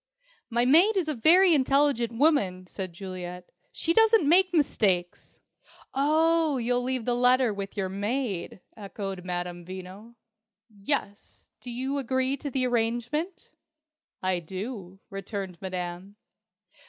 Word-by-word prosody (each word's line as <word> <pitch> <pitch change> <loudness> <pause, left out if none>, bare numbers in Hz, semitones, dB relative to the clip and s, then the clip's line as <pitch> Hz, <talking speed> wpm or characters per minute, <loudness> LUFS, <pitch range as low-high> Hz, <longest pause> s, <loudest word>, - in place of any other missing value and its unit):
"My 240 0 +1
maid 350 - +5
is 355 -4 0
a 305 - 0
very 340 +8 +5
intelligent 275 -4 +2
woman," 205 - +2
said 185 0 -6
Juliet. 180 0 -8 0.2
"She 330 - -1
doesn't 445 -5 +4
make 365 +4 +5
mistakes." 195 - 0 0.5
"Oh, 315 +1 +2
you'll 245 +1 0
leave 255 -2 -3
the 245 - +1
letter 250 -1 +3
with 200 +1 -7
your 195 -2 -1
maid!" 205 -1 -3
echoed 195 -3 -6
Madame 175 -1 -4
Veno. 190 +5 -10 0.7
"Yes. 205 -4 -4
Do 250 - -9
you 260 +4 -2
agree 260 +1 0
to 285 - -5
the 255 -1 0
arrangement?" 245 +9 -2 0.7
"I 185 -1 +1
do," 190 +2 -7
returned 195 -2 -6
Madame. 185 +1 -5
235 Hz, 125 wpm, -27 LUFS, 190-280 Hz, 0.7 s, maid